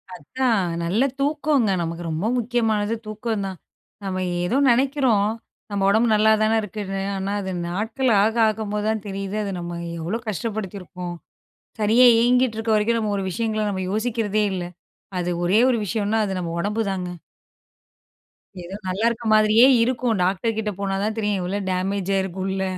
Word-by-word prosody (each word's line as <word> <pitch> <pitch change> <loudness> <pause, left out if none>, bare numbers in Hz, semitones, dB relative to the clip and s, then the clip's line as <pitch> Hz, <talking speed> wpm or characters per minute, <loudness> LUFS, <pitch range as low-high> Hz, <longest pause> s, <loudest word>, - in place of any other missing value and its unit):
அதான் 225 - 0 0.2
நல்ல 190 +9 +1 0.2
தூக்கங்க, 290 -6 +1
நமக்கு 170 +1 -4
ரொம்ப 160 +5 -2
முக்கியமானது 225 -3 0
தூக்கம் 215 -1 -3
தான். 190 -1 -5 0.5
நம்ம 185 -1 -2 0.2
ஏதோ 220 +9 +1
நெனைக்கிறோம், 250 -4 +2 0.4
"நம்ம 200 -1 0
உடம்பு 220 +4 +3
நல்லாதானே 215 +1 +3
இருக்குன்னு" 195 -1 -5
ஆனா 195 +1 -2
அது 190 -1 -4 0.2
நாட்கள் 220 +8 -1
ஆக 220 +2 +1
ஆகும்போது 210 -1 -2
தான் 220 -2 -1
தெரியுது 195 +1 -4
அது 200 - -3
நம்ம 175 0 -5 0.2
எவ்வளோ 175 +8 -2
கஷ்டப்படுத்தியிருக்கோம், 190 -4 -5 0.6
சரியா 225 +4 +5
இயங்கிட்டு 245 0 +3
இருக்க 225 0 -1
வரைக்கும் 225 +2 +2
நம்ம 215 -2 -1
ஒரு 195 - -2
விஷயங்களை 220 +1 -1
நம்ம 190 -2 -2
யோசிக்கிறதே 215 -1 0
இல்லை, 175 -2 -4 0.5
அது 175 0 -2 0.2
ஒரே 190 +5 +4
ஒரு 245 - +2
விஷயம்னா 210 +2 0
அது 190 -2 -3
நம்ம 170 -2 -4
ஒடம்பு 210 +5 -1
தாங்க. 180 -2 -3 1.5
ஏதோ 185 +3 -7
நல்லா 190 +4 -1
இருக்கிற 235 -1 -2
மாதிரியே 215 +2 +6 0.2
இருக்கும், 245 -1 0
டாக்டர் 195 +5 0
கிட்ட 215 -1 -1
போனா 195 -1 -1
தான் 215 +1 -1
தெரியும், 205 -3 0
எவ்வளோ 185 +3 -2
டேமேஜ் 190 +1 -1
ஆயிருக்கும் 190 -1 -2
உள்ள 190 0 -1
210 Hz, 155 wpm, -23 LUFS, 190-225 Hz, 1.5 s, மாதிரியே